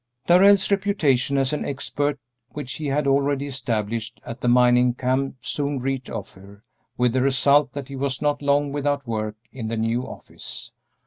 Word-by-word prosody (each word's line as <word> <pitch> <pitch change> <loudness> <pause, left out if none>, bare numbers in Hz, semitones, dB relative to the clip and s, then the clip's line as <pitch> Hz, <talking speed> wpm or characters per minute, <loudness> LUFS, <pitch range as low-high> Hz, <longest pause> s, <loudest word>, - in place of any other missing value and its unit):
Darrell's 195 +3 +5
reputation 155 -10 +2
as 135 +1 +1
an 150 - -1
expert 145 +1 -2 0.4
which 145 -3 -5
he 155 - -4
had 140 +1 0
already 140 0 +1
established 115 -3 -3
at 115 - -7
the - - -1
mining 125 0 +4
camp 130 +2 -1
soon 145 +1 -2
reached 130 0 -3
Ophir, 100 -1 -9 0.3
with 125 -1 +2
the 130 - +2
result 140 +1 +3
that 140 -2 -6
he 140 - -8
was 135 -1 -2
not 145 -1 0
long 145 0 +2
without 145 -1 -1
work 110 -2 -3 0.2
in 120 -4 -6
the 115 +1 -2
new 115 +2 0
office. - - -9
135 Hz, 170 wpm, -23 LUFS, 125-145 Hz, 0.4 s, Darrell's